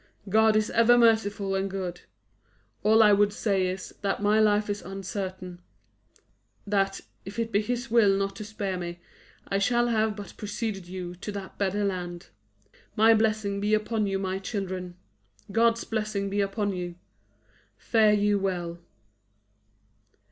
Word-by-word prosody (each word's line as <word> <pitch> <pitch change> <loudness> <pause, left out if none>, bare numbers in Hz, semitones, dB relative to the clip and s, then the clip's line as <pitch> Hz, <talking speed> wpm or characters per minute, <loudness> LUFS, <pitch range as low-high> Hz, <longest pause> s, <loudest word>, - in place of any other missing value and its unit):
God 220 +1 +4
is 215 +1 +1
ever 230 +1 +5
merciful 205 -4 +2
and 195 0 -1
good. 185 -2 -5 0.8
All 220 +2 +5
I 210 -1 +6
would 205 0 +4
say 195 -3 0
is, 185 +1 -5
that 200 -1 -1
my 210 +1 +3
life 210 -1 +3
is 205 0 -3
uncertain; 185 -1 -6 1.0
that, 195 -1 0 0.2
if 200 +3 -9
it 230 -1 -2
be 205 - +2
His 245 +2 -3
will 210 -4 +5
not 195 0 -2
to 215 - -6
spare 200 -3 -4
me, 175 0 -6 0.5
I 195 - 0
shall 240 +4 +2
have 220 -2 +1
but 205 -2 -9
preceded 210 -3 -4
you 180 -1 -6
to 205 +3 -6
that 195 -2 -8
better 200 +1 0
land. 175 -3 -4 0.7
My 225 +1 +6
blessing 215 -2 +1
be 210 +1 +3
upon 215 0 -1
you, 195 0 0
my 190 0 -2
children! 185 -3 -4 0.6
God's 230 +1 +3
blessing 215 -3 -2
be 205 +1 +1
upon 200 0 -1
you! 175 -1 -5 0.8
Fare 220 -2 +3
you 205 0 +2
well." 175 -3 -3
205 Hz, 150 wpm, -27 LUFS, 190-215 Hz, 1.0 s, I